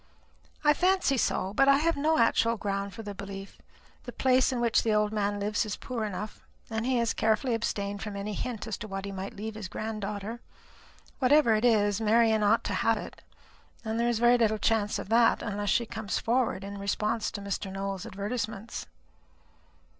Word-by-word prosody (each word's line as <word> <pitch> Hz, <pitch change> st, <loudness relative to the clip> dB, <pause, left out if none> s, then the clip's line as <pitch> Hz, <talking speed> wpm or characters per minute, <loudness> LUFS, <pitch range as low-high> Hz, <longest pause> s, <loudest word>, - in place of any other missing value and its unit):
"I 295 Hz, 0 st, +6 dB
fancy 365 Hz, -3 st, +2 dB
so. 195 Hz, -5 st, 0 dB
But 275 Hz, +4 st, +4 dB
I 275 Hz, -, +7 dB
have 330 Hz, +3 st, +1 dB
no 310 Hz, +3 st, +2 dB
actual 230 Hz, 0 st, +3 dB
ground 200 Hz, -1 st, -2 dB
for 225 Hz, +4 st, -8 dB
the 205 Hz, -1 st, -6 dB
belief. 195 Hz, 0 st, -8 dB, 0.5 s
The -, -, -6 dB
place 260 Hz, 0 st, +3 dB
in 250 Hz, -, -2 dB
which 235 Hz, -1 st, +3 dB
the 220 Hz, -2 st, +1 dB
old 210 Hz, 0 st, +2 dB
man 205 Hz, -1 st, 0 dB
lives 210 Hz, +1 st, 0 dB
is 210 Hz, -2 st, -4 dB
poor 235 Hz, -4 st, -4 dB
enough, 210 Hz, +1 st, -6 dB, 0.3 s
and 225 Hz, +2 st, -2 dB
he 260 Hz, -1 st, +2 dB
has 235 Hz, -1 st, +1 dB
carefully 220 Hz, +3 st, +1 dB
abstained 200 Hz, -3 st, -2 dB
from 210 Hz, -2 st, -5 dB
any 200 Hz, +1 st, -4 dB
hint 225 Hz, +1 st, -4 dB
as 220 Hz, -4 st, -4 dB
to 215 Hz, -, -6 dB
what 195 Hz, -1 st, -5 dB
he 200 Hz, -, -5 dB
might 195 Hz, 0 st, -6 dB
leave 220 Hz, +2 st, -5 dB
his 215 Hz, -3 st, -6 dB
granddaughter. 215 Hz, +2 st, -5 dB, 0.8 s
Whatever 265 Hz, -2 st, +5 dB
it 215 Hz, +1 st, +1 dB
is, 205 Hz, -3 st, +3 dB
Marian 220 Hz, 0 st, +4 dB
ought 210 Hz, +2 st, +3 dB
to -, -, -2 dB
have -, -, +3 dB
it; -, -, -8 dB, 0.6 s
and 220 Hz, +1 st, -2 dB
there 235 Hz, +1 st, +2 dB
is 235 Hz, -, +1 dB
very 240 Hz, +1 st, +4 dB
little 220 Hz, -2 st, +2 dB
chance 210 Hz, -1 st, +1 dB
of -, -, -7 dB
that, 230 Hz, +1 st, +4 dB
unless 205 Hz, -1 st, -2 dB
she 235 Hz, -, +2 dB
comes 220 Hz, -2 st, -3 dB
forward 235 Hz, -5 st, 0 dB
in 200 Hz, 0 st, -7 dB
response 210 Hz, +3 st, -1 dB
to -, -, -6 dB
Mr. 200 Hz, 0 st, -4 dB
Nowell's 195 Hz, -1 st, -4 dB
advertisements." 215 Hz, +1 st, -4 dB
220 Hz, 195 wpm, -28 LUFS, 200-235 Hz, 0.8 s, I